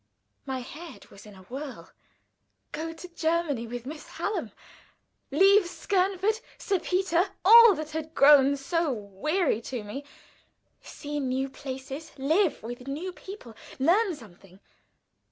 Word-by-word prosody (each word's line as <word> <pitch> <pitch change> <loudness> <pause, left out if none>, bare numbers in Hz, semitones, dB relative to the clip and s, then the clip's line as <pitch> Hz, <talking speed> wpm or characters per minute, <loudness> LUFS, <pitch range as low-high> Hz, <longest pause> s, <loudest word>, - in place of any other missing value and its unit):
My 260 -1 -3
head 315 +6 -11
was 195 +2 -14
in 205 - -13
a 190 - -15
whirl. 265 +6 -8 0.8
Go 325 +2 -4
to 325 +2 -10
Germany 320 -7 -1
with 240 +1 -6
Miss 300 +3 -8
Hallam; 420 - -3 0.8
leave 390 +6 +5
Skernford, 390 +4 0 0.2
Sir 390 -4 -1
Peter, 365 +1 +1 0.2
all 460 0 +9
that 310 0 -6
had 315 +1 -5
grown 280 0 +6
so 330 +3 0
weary 225 - -1
to 240 -1 -5
me; 240 +8 -7 0.8
see 295 0 -6
new 265 0 -1
places, 270 +3 -7
live 315 - +1
with 245 +3 -7
new 325 +7 -4
people; 370 - -11 0.2
learn 355 +7 +3
something! 195 -6 -16
300 Hz, 130 wpm, -27 LUFS, 260-360 Hz, 0.8 s, all